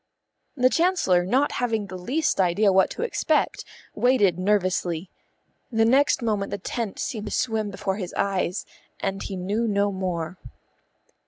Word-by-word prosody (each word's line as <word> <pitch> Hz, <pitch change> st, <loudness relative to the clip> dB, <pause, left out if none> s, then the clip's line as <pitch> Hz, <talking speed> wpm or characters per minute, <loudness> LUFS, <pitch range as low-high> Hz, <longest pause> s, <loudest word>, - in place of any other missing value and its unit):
The 255 Hz, 0 st, +4 dB
Chancellor, 330 Hz, -, +3 dB
not 255 Hz, +10 st, +2 dB
having 225 Hz, -4 st, -1 dB
the 190 Hz, -1 st, -8 dB
least 250 Hz, -, -1 dB
idea 190 Hz, +3 st, +3 dB
what 190 Hz, 0 st, +4 dB
to 450 Hz, -, -4 dB
expect, 475 Hz, -, 0 dB, 0.3 s
waited 205 Hz, -9 st, +3 dB
nervously. 185 Hz, -3 st, 0 dB, 0.6 s
The 225 Hz, -1 st, +3 dB
next 265 Hz, +1 st, +3 dB
moment 210 Hz, -3 st, 0 dB
the -, -, -3 dB
tent 210 Hz, +2 st, -4 dB
seemed 215 Hz, -3 st, -4 dB
to -, -, -5 dB
swim 220 Hz, -3 st, 0 dB
before 195 Hz, -1 st, -3 dB
his 185 Hz, -4 st, -5 dB
eyes, 195 Hz, -1 st, -1 dB, 0.3 s
and 195 Hz, 0 st, -2 dB
he 195 Hz, -, -5 dB
knew 205 Hz, +6 st, -1 dB
no 200 Hz, -1 st, +1 dB
more. 180 Hz, -2 st, -3 dB
200 Hz, 150 wpm, -25 LUFS, 185-230 Hz, 0.6 s, The